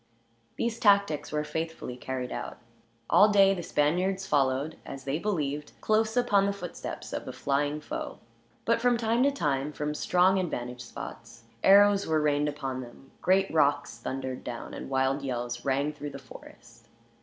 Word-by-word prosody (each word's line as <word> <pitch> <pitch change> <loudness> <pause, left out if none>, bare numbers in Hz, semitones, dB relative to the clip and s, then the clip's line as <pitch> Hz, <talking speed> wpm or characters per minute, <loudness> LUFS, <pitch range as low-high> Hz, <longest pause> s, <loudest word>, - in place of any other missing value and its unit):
These 235 0 -2
tactics 200 -8 +3
were 150 0 0
faithfully 160 -4 -4
carried 125 0 -4
out. - - -5 0.5
All 210 - +6
day 195 -1 +6
the 180 - -4
Spaniards 180 +5 0
followed, 140 0 +1
as 135 -1 -8
they 140 +3 -2
believed, 150 -7 -2
close 220 +2 +1
upon 205 -5 +3
the 200 - 0
footsteps 180 -4 -7
of - - -4
the - - -5
flying 145 +2 -1
foe; - - -5 0.5
but 230 0 +2
from 245 0 +3
time 230 +1 +1
to 280 - +5
time, 145 - -1
from 150 0 -3
strong 180 +4 +3
advantage 125 -8 -4
spots, 115 0 -9 0.2
arrows 200 0 +6
were 160 -1 +2
rained 150 0 +2
upon 135 -3 -4
them, 125 +2 -13
great 190 0 +2
rocks 145 -6 +2
thundered 130 +1 -4
down, 120 -1 -6
and - - -7
wild 135 +1 +1
yells 120 -2 -3
rang 140 +2 +1
through 145 0 -6
the 140 - -8
forest. 135 - -15
150 Hz, 165 wpm, -28 LUFS, 135-195 Hz, 0.5 s, All